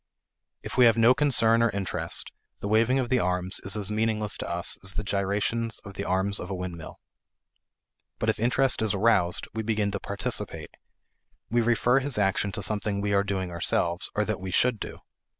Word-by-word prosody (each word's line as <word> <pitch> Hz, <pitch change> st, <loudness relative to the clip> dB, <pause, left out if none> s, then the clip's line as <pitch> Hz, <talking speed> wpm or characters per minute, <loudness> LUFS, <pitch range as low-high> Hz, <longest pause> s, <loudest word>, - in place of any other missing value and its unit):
If -, -, -7 dB
we 125 Hz, -, +7 dB
have 115 Hz, -1 st, +5 dB
no 115 Hz, +2 st, +6 dB
concern 115 Hz, -5 st, +5 dB
or 115 Hz, -, +3 dB
interest, 100 Hz, -3 st, -2 dB, 0.3 s
the -, -, -5 dB
waving 115 Hz, +5 st, +3 dB
of 130 Hz, -3 st, -1 dB
the 130 Hz, -, +2 dB
arms 90 Hz, 0 st, -1 dB
is 100 Hz, +3 st, -2 dB
as 105 Hz, -1 st, -3 dB
meaningless 110 Hz, -1 st, 0 dB
to -, -, -5 dB
us 85 Hz, 0 st, -2 dB
as 95 Hz, 0 st, -2 dB
the 105 Hz, -, -2 dB
gyrations 100 Hz, +3 st, -1 dB
of 100 Hz, -, -9 dB
the 100 Hz, +1 st, -5 dB
arms 95 Hz, +2 st, +1 dB
of 90 Hz, -, -7 dB
a 95 Hz, -, -3 dB
windmill. 90 Hz, -3 st, -7 dB, 1.2 s
But -, -, -3 dB
if -, -, 0 dB
interest 125 Hz, +3 st, +2 dB
is 110 Hz, -2 st, 0 dB
aroused, 95 Hz, -4 st, +2 dB
we 110 Hz, -, -3 dB
begin 105 Hz, -2 st, -1 dB
to 100 Hz, -, -3 dB
participate. 100 Hz, -7 st, -4 dB, 0.8 s
We 120 Hz, 0 st, +3 dB
refer 120 Hz, +2 st, +2 dB
his 135 Hz, -2 st, -3 dB
action 100 Hz, 0 st, +1 dB
to 100 Hz, -, -3 dB
something 105 Hz, 0 st, -1 dB
we 100 Hz, 0 st, -1 dB
are 100 Hz, 0 st, +3 dB
doing 95 Hz, -2 st, -3 dB
ourselves 85 Hz, +1 st, 0 dB
or 105 Hz, -, +1 dB
that 110 Hz, -2 st, -3 dB
we 95 Hz, -, -5 dB
should 115 Hz, +4 st, +1 dB
do. -, -, -7 dB
105 Hz, 195 wpm, -26 LUFS, 95-115 Hz, 1.2 s, we